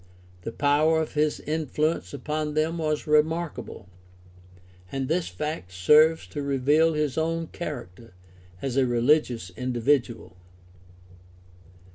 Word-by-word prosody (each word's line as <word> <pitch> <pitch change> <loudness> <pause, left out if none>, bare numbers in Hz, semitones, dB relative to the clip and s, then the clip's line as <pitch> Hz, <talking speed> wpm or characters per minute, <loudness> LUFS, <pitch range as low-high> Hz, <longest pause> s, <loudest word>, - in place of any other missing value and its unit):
The 115 - -5
power 150 +4 +2
of 160 - -3
his 150 0 0
influence 155 - -1
upon 150 0 -3
them 160 +2 0
was 155 -1 -1
remark 155 +2 +1
able, - - -10 1.0
and 135 -1 -2
this 165 +4 0
fact 150 - -5
serves 150 - +4
to 145 - -5
reveal 145 +4 +2
his 150 -1 -1
own 165 +1 -1
character 115 - -8 0.5
as 135 -1 -2
a 130 -2 +3
religious 120 - +1
individual. 120 - -1
150 Hz, 115 wpm, -26 LUFS, 125-155 Hz, 1.0 s, serves